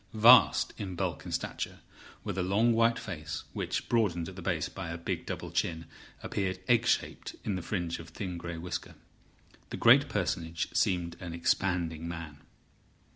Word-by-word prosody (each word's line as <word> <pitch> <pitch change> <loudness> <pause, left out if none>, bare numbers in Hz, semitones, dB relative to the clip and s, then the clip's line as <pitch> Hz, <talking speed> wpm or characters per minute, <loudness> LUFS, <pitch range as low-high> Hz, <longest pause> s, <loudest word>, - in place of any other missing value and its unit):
Vast 115 +4 +7
in 95 -3 -4
bulk - - -2
and - - -6
stature, - - -3 0.5
with - - -3
a 95 - 0
long 105 +6 +3
white 115 +1 +3
face, 80 -6 -5
which, - - -2
broadened 100 -8 +1
at 95 - -8
the 95 - -8
base 85 -4 0
by 95 -3 -6
a 85 - -4
big 85 - -4
double - - -5
chin, 80 -1 -1 0.4
appeared 95 -2 -1
egg 120 -2 +4
shaped - - 0
in 105 - -1
the 90 - -3
fringe 85 -3 -2
of 80 0 -10
thin 90 0 -5
greyish 85 -1 -6
whisker, 90 +1 -5 0.7
the - - -5
great - - +6
personage 80 0 -1
seemed 85 -2 +1
an 85 -2 -6
expanding 85 -2 0
man. 80 -4 -7
90 Hz, 170 wpm, -30 LUFS, 85-100 Hz, 0.7 s, Vast